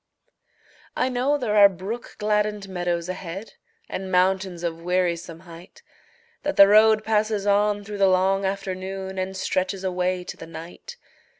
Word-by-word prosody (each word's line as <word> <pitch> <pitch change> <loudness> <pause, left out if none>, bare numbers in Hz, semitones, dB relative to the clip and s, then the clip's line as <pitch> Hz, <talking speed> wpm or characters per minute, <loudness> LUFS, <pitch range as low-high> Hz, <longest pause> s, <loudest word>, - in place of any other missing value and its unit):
I 260 - +1
know 260 +4 +1
there 235 -6 -1
are 200 -1 +8
brook 195 +6 -7
gladdened 210 -1 0
meadows 175 -2 -2
ahead, 185 +3 -7 0.3
And 190 0 -5
mountains 185 -1 +1
of 165 -1 -3
wearisome 170 -2 -1
height; 175 - -14 0.6
That 295 - -2
the 200 - +9
road 215 +1 +5
passes 215 -2 0
on 205 0 +2
through 205 0 -7
the 195 - +5
long 190 +1 +2
afternoon 190 0 -4
And 190 +1 -3
stretches 185 +1 -2
away 180 -1 -1
to - - -7
the 165 - -10
night. 170 - -10
190 Hz, 145 wpm, -24 LUFS, 180-210 Hz, 0.6 s, the